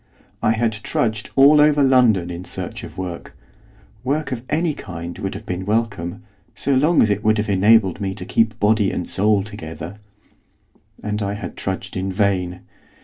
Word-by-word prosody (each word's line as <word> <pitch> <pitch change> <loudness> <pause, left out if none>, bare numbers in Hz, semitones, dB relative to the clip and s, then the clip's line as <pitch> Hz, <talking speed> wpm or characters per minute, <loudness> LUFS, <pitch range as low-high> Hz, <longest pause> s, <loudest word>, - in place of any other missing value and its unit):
I 110 - +3
had 115 0 +1
trudged 110 0 -2
all 145 +2 +7
over 150 -1 +4
London 120 -10 +4
in 85 +1 -6
search - - -4
of - - -10
work, 90 -2 -6 0.7
work 140 +2 -1
of 125 -3 -3
any 160 +1 +1
kind 85 -6 -7
would 95 - -4
have - - -8
been 90 +1 -4
welcome, 105 -2 -2 0.3
so 140 - 0
long 150 +6 +4
as 105 - +2
it 105 0 -1
would 110 +1 +3
have 105 0 -1
enabled 100 0 +4
me 95 -1 -2
to 90 - -7
keep 110 +1 +1
body 105 -1 +3
and 90 - -3
soul 105 0 +2
together. 85 -2 -8 1.1
And 105 0 -2
I 100 0 -1
had 100 -4 -7
trudged 95 -1 -4
in 95 +1 -2
vain. 95 -2 0
105 Hz, 175 wpm, -21 LUFS, 95-115 Hz, 1.1 s, all